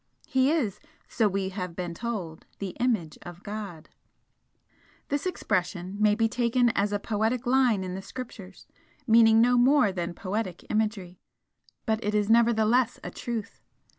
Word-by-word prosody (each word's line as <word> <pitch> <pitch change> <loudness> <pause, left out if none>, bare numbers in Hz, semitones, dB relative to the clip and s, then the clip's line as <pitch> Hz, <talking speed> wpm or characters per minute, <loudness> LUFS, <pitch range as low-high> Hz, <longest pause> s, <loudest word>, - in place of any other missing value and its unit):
He 265 0 +2
is, 235 - 0 0.3
so 225 -3 +1
we 195 -1 -1
have 180 -3 -5
been 175 -1 -4
told 185 -6 -5
'the 200 - -4
image 220 -11 0
of 175 +1 -11
God.' 200 -6 -7 1.2
This 285 +5 -1
expression 185 - -2
may 210 -1 +4
be 225 +1 +2
taken 240 +1 +2
as 205 -2 0
a 205 - +1
poetic 220 +4 -1
line 245 -5 +3
in 185 -1 -5
the 190 - -5
Scriptures, 200 -5 -9 0.4
meaning 225 -1 +6
no 245 +1 +4
more 260 -3 +4
than 175 -2 -4
poetic 185 -2 -4
imagery, 210 -5 -2 0.7
but 220 0 0
it 210 +1 -1
is 210 +1 +2
nevertheless 235 +1 +3
a - - -6
truth. 230 -4 -5
215 Hz, 150 wpm, -27 LUFS, 190-235 Hz, 1.2 s, meaning